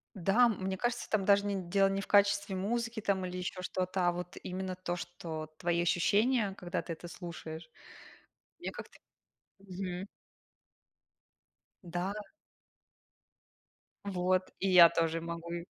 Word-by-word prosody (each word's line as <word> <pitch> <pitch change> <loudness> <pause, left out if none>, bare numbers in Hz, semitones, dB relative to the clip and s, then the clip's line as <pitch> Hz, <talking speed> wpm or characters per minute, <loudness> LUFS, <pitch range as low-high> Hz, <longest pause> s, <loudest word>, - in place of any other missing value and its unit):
Да, 200 +6 +4
мне 190 -3 -2
кажется, 240 +4 -1
там 205 -3 +1
даже 200 0 +4
не 200 - 0 0.2
дело 195 0 +4
не 195 0 -1
в - - -7
качестве 200 0 +3
музыки 225 +4 -1
там, 195 -2 0
или 180 0 -4
ещё 180 0 -4
что-то, 185 0 0
а - - +3
вот 180 +1 -6
именно 185 0 -4
то, 180 -1 -3
что 160 -3 -6
твои 170 0 +1
ощущения, 205 +5 +2
когда 180 +1 -3
ты 170 - -5
это 170 +1 -8
слушаешь. 170 -2 -8 0.9
Я - - -3
как-то - - -10 0.6
Мгм. 185 -1 -5 1.8
Да. 175 +3 -2 1.9
Вот, 185 -1 0
и 195 - 0
я 180 -2 +9
тоже 165 0 0
могу 170 0 -6
и 170 0 -4
185 Hz, 135 wpm, -32 LUFS, 175-200 Hz, 1.9 s, я